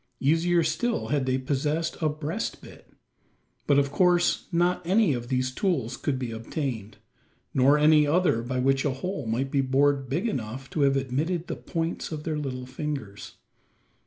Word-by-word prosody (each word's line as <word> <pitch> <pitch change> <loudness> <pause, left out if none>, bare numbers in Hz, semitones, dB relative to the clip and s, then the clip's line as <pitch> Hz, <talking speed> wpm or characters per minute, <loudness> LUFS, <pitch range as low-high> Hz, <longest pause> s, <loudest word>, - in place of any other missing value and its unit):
Easier 165 +5 +3
still 240 +7 -1
had 140 -3 0
they 130 0 +2
possessed 145 +5 -1
a 155 - +2
"breast 155 +7 -4
bit." - - -15 0.8
But 140 - +4
of 140 -1 +2
course 175 +2 +2
not 175 +1 +2
any 190 -1 +3
of 120 -1 -4
these 130 0 0
tools 130 - -1
could 145 -3 -2
be 125 -3 -4
obtained; 115 -1 -4 0.6
nor 135 +3 +5
any 150 0 +5
other 155 -6 +2
by 125 +2 -3
which 135 +1 +2
a 145 - +1
hole 140 - -4
might 130 +4 -1
be 140 - +2
bored 135 0 +2
big 145 - 0
enough 130 - -4
to 155 - -1
have 140 -1 +4
admitted 150 +7 -1
the - - -4
points 165 0 -3
of 155 -1 -5
their 155 -2 -2
little 130 -3 -4
fingers. 130 -6 -6
140 Hz, 170 wpm, -26 LUFS, 130-165 Hz, 0.8 s, nor